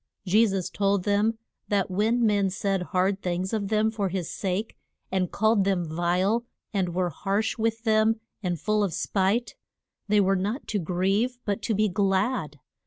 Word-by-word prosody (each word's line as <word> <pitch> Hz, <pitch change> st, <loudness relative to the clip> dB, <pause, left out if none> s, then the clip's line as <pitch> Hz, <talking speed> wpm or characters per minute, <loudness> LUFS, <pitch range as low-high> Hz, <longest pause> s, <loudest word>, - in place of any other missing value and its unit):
Je 215 Hz, +5 st, +4 dB
sus 190 Hz, -3 st, -2 dB
told 200 Hz, -2 st, +1 dB
them 210 Hz, +3 st, +1 dB, 0.3 s
that 200 Hz, -2 st, 0 dB
when 225 Hz, +5 st, +2 dB
men 200 Hz, -2 st, +2 dB
said 195 Hz, 0 st, -1 dB
hard 190 Hz, +2 st, 0 dB
things 180 Hz, +3 st, -2 dB
of 210 Hz, -3 st, -1 dB
them 215 Hz, +1 st, +2 dB
for 205 Hz, -3 st, -1 dB
his 180 Hz, -2 st, -3 dB
sake, 195 Hz, +3 st, -2 dB, 0.4 s
and 185 Hz, -2 st, 0 dB
called 215 Hz, -1 st, +3 dB
them 190 Hz, -3 st, +1 dB
vile, 180 Hz, +7 st, +1 dB, 0.3 s
and 180 Hz, -4 st, -1 dB
were 180 Hz, -1 st, 0 dB
harsh 200 Hz, +7 st, -1 dB
with 225 Hz, 0 st, 0 dB
them 220 Hz, 0 st, +3 dB, 0.2 s
and 175 Hz, -4 st, -2 dB
full 215 Hz, +3 st, +1 dB
of 190 Hz, -5 st, -1 dB
spite, 205 Hz, +5 st, 0 dB, 0.5 s
they 210 Hz, 0 st, +4 dB
were 195 Hz, 0 st, +3 dB
not 205 Hz, +8 st, -2 dB
to 210 Hz, -, -1 dB
grieve 195 Hz, +8 st, 0 dB
but 205 Hz, +1 st, -1 dB
to 220 Hz, -, -1 dB
be 215 Hz, +2 st, +3 dB
glad. 195 Hz, -, 0 dB
200 Hz, 175 wpm, -26 LUFS, 185-215 Hz, 0.5 s, Je